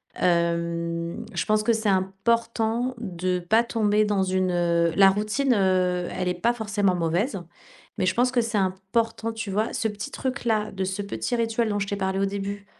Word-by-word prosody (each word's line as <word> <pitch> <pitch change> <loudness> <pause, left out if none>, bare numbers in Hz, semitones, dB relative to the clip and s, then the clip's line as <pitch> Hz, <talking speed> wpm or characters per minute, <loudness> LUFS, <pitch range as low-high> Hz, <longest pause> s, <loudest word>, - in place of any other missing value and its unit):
hem, 170 -1 -1
je - - -1
pense 215 0 +2
que 230 - +3
c'est 220 -1 0
important 225 +5 0
de 185 -4 -2
pas 220 +7 +3
tomber 215 -2 +1
dans 205 -2 +1
une 185 0 0
heu, 170 -1 +2
la 195 -1 +7
routine, 215 +7 +1
heu, 185 -3 +1
elle 185 - -2
est - - +1
pas 230 +7 +1
forcément 205 -5 0
mauvaise. 175 - 0 0.6
Mais, - - +2
je 185 - +1
pense 250 +1 +3
que 250 -2 +2
c'est 230 -1 -2
important, 195 +4 -1
tu 225 -2 -5
vois? 215 +3 0
Ce 225 - 0
petit 210 +6 -6
truc-là, 235 -6 -1
de 190 0 -3
ce 190 +2 -3
petit 200 +4 -3
rituel 230 -1 0
dont 205 -1 -1
je 200 - -1
t'ai 200 - -2
parlé 190 0 -1
au 195 - +2
début, 200 0 -4
200 Hz, 190 wpm, -25 LUFS, 185-225 Hz, 0.6 s, la